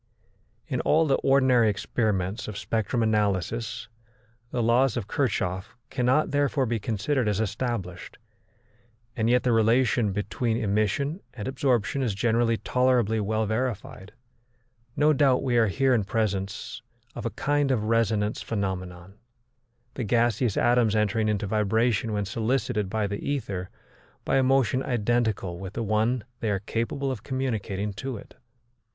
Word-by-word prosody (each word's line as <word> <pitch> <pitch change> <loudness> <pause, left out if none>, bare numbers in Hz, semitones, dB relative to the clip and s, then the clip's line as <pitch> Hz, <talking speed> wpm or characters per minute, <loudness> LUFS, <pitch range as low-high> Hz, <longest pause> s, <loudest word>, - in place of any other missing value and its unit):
In - - -1
all 160 +1 +3
the 135 -3 +2
ordinary 130 -4 +4
experiments 100 -1 -1
of 105 -2 -6
spectrum 115 +3 -1
analysis 110 +1 -1 0.6
the 120 - -1
laws 120 +2 +3
of 110 -4 -3
Kirchhoff 95 -9 -2
cannot 130 +4 +2
therefore 145 -1 +1
be 115 -1 -1
considered 115 +4 -1
as 105 -1 0
established, 110 -3 -3 1.0
and 110 0 +1
yet 125 +1 +3
the 125 - +2
relation 115 -1 +3
between 110 +3 -1
emission 110 - 0
and 105 -2 -5
absorption 130 -1 0
is 115 -7 -1
generally 115 +1 +2
tolerably 125 -4 +1
well 110 +1 0
verified. 110 -3 -3 0.8
No 150 +1 +4
doubt 135 -3 +3
we 125 -3 0
are 115 -1 +4
here 130 +6 +2
in 115 -4 +2
presence 100 -2 -2 0.3
of - - -7
a - - -1
kind 145 -1 +1
of 125 -5 +1
resonance 110 -1 +1
phenomenon, 95 -2 -4 0.7
the 130 - -4
gaseous 115 0 +1
atoms 120 -3 +3
entering 110 +1 +1
into 105 -1 -1
vibration 110 +2 +1
when 105 -1 -1
solicited 110 -1 -1
by 110 +1 -1
the 100 0 -3
ether 100 -10 -3 0.6
by - - +2
a - - +4
motion 130 -1 +2
identical 110 -7 -1
with 95 0 -7
the 115 - -3
one 110 +3 +1 0.2
they 110 - -1
are 100 - +1
capable 115 +6 -2
of 120 -6 -5
communicating 110 -6 -3
to 130 +4 -5
it. - - -13
115 Hz, 145 wpm, -26 LUFS, 105-125 Hz, 1.0 s, ordinary